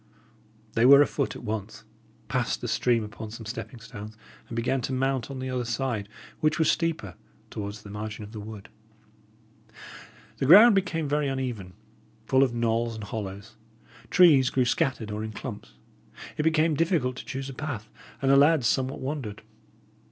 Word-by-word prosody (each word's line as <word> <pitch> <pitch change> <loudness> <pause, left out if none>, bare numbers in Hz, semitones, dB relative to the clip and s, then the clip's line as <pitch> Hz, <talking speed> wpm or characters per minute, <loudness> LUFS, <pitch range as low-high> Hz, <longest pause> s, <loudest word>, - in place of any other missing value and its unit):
They 115 - +2
were 140 +3 +9
afoot 140 -1 -2
at - - -9
once, 110 -2 -5 0.4
passed 125 -3 -1
the 120 - -5
stream 120 0 +1
upon 105 +1 -8
some 115 +1 -9
stepping 120 +2 -7
stones, 110 -1 -10 0.3
and 115 - -6
began 125 +3 0
to 130 - -3
mount 130 -1 -1
on 135 - -6
the 130 0 -4
other 125 -1 -1
side, 120 -3 -2 0.3
which 155 0 +1
was 160 -2 +4
steeper, 160 - -2 0.4
towards 105 0 -6
the 100 - -10
margin 105 +1 -6
of 105 - -10
the 110 - -7
wood. 105 -1 -9 1.7
The 135 - -1
ground 210 - +9
became 170 -5 0
very 145 0 0
uneven, 125 -9 -4 0.5
full 130 - +3
of 135 -3 +3
knolls 115 0 0
and 110 - -7
hollows; 100 0 -7 0.5
trees 150 -8 +6
grew 130 -2 +1
scattered 125 -5 0
or 105 +1 -3
in 110 0 -6
clumps; - - -8 0.6
it - - -1
became 160 0 +2
difficult 155 -5 +1
to - - -8
choose 135 0 -5
a 135 - -7
path, 130 -7 -5 0.4
and 135 - +4
the - - +6
lads 145 -2 +5
somewhat 130 +4 0
wandered. 130 -7 -5
125 Hz, 170 wpm, -27 LUFS, 110-140 Hz, 1.7 s, were